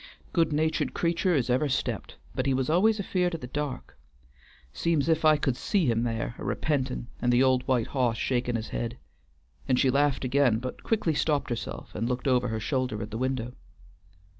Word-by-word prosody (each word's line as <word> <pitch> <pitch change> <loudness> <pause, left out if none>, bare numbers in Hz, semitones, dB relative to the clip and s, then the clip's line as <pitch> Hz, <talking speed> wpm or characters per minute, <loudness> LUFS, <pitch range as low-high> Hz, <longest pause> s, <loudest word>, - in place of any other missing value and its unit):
Good 165 -2 +2
natured 155 +1 0
creatur' 170 +1 +1
as 125 -3 +1
ever 140 +4 +2
stept; 135 - -2 0.2
but 130 - -1
he 135 - +3
always 175 - +3
was - - -10
afeard 180 -3 0
of 165 - -7
the - - -5
dark, 145 +1 -5 0.7
'seems 155 - +1
's - - 0
if 160 0 +2
I 155 -1 +6
could 135 -4 0
see 195 - 0
him 115 -3 +2
there 115 0 -2
a - - -6
repentin' 130 -5 -1 0.2
and 120 - +2
the 120 +2 +4
old 130 -1 +3
white 125 -4 +2
hoss 125 -4 0
shakin' 120 -1 0
his 115 -1 -3
head," 120 +1 -3 0.7
and 130 -2 +3
she 130 - +4
laughed 140 -1 +2
again, 130 -3 +3
but 125 +2 -6
quickly 210 -8 0
stopped 145 -3 0
herself 115 -2 -5
and 115 +2 -2
looked 125 +2 -2
over 125 -2 +3
her 110 0 -2
shoulder 125 0 -1
at 105 - -8
the 110 - -3
window. 130 -2 -2
130 Hz, 200 wpm, -27 LUFS, 120-155 Hz, 0.7 s, I